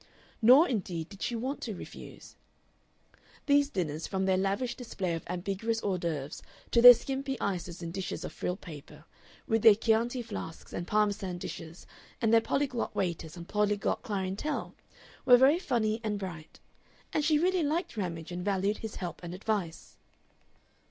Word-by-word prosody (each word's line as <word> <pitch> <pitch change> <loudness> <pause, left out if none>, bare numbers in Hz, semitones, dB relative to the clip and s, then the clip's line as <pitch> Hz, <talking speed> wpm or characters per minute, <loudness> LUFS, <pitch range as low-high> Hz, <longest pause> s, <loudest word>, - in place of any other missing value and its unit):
Nor, 255 +9 +8
indeed, 180 -8 -3
did 200 -1 -13
she 240 - -1
want 260 +5 -3
to 220 -4 -4
refuse. - - -11 1.1
These 285 -1 +4
dinners, 160 - -3
from 190 -1 -1
their 190 -1 +3
lavish 200 +6 0
display 195 -8 -3
of 165 - -3
ambiguous 195 +6 -2
hors 190 -3 0
d'oeuvre 155 -4 -4 0.3
to 235 - +4
their 245 0 +12
skimpy 270 +2 -4
ices 180 -2 -3
in 165 - -4
dishes 190 +1 -4
of - - -7
frilled 180 +2 -3
paper, 150 -1 -11 0.4
with 225 0 +1
their 220 -1 +8
Chianti 230 +3 +1
flasks 210 -7 -8
and 175 - -4
Parmesan 205 -3 0
dishes 170 -1 -8 0.3
and 230 -2 +2
their 225 - +7
polyglot 260 -3 -1
waiters 170 -4 -3
and 170 0 -9
polyglot 210 0 0
clientele, 200 +6 -3 0.5
were 250 -2 +8
very 275 +7 +5
funny 225 - 0
and 210 -2 -1
bright; 170 -5 -8 0.5
and 305 - +1
she 305 0 +4
really 365 +3 +2
liked 315 -2 -1
Ramage, 170 -5 -4
and 175 0 -4
valued 200 +1 0
his 220 -1 -6
help 175 -2 -6
and 175 0 -6
advice. 195 -4 -3
205 Hz, 160 wpm, -30 LUFS, 180-240 Hz, 1.1 s, their